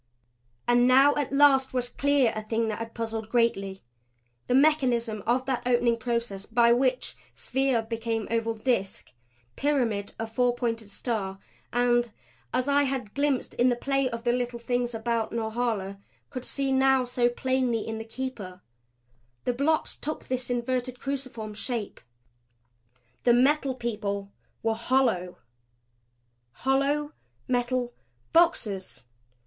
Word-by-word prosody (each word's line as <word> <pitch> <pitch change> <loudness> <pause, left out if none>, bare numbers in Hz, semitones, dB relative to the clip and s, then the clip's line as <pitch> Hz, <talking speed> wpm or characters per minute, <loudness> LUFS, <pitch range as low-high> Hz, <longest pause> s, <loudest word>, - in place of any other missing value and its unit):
And 245 0 +5
now 270 +3 +6
at 290 -3 -2
last 275 -2 +4
was 250 -1 +1
clear 280 -2 +2
a 215 - -2
thing 225 +1 -1
that 215 - -3
had 230 0 -6
puzzled 225 -1 -4
greatly 195 -5 0 0.6
the 250 - +2
mechanism 250 -7 +3
of 250 +2 +2
that 260 -2 -1
opening 240 -1 +3
process 230 -4 -3
by 235 0 +4
which 255 +1 0 0.2
sphere 265 -3 0
became 225 -1 -3
oval 230 0 0
disk, 215 - -2 0.4
pyramid 240 -8 0
a 225 - -2
four 245 +2 +1
pointed 230 -3 -2
star 200 -3 -3 0.3
and 240 -1 +2 0.4
as 255 +2 0
I 285 0 +4
had 260 -6 -3
glimpsed 280 -2 0
in 245 +1 +3
the 245 - +2
play 275 +1 0
of 230 -1 -6
the 240 - +2
Little 245 0 -1
Things 245 0 -1
about 225 0 -1
Norhala, 220 -4 -2 0.3
could 255 -3 -6
see 275 -1 -1
now 265 -1 +4
so 245 0 +1
plainly 255 -2 0
in 220 0 -4
the - - -4
Keeper 225 -6 -6 0.8
the 250 - 0
blocks 295 +5 0
took 305 - -5
this 255 -1 -2
inverted 250 +1 -1
cruciform 255 -6 -4
shape. 220 0 -4 1.2
The 240 - +4
Metal 270 +2 +3
People 205 -4 -3 0.3
were 225 0 +2
hollow! 225 -6 +1 1.2
Hollow 280 +3 +1 0.4
metal 245 0 0 0.4
boxes! 210 - +1
240 Hz, 135 wpm, -27 LUFS, 225-260 Hz, 1.2 s, now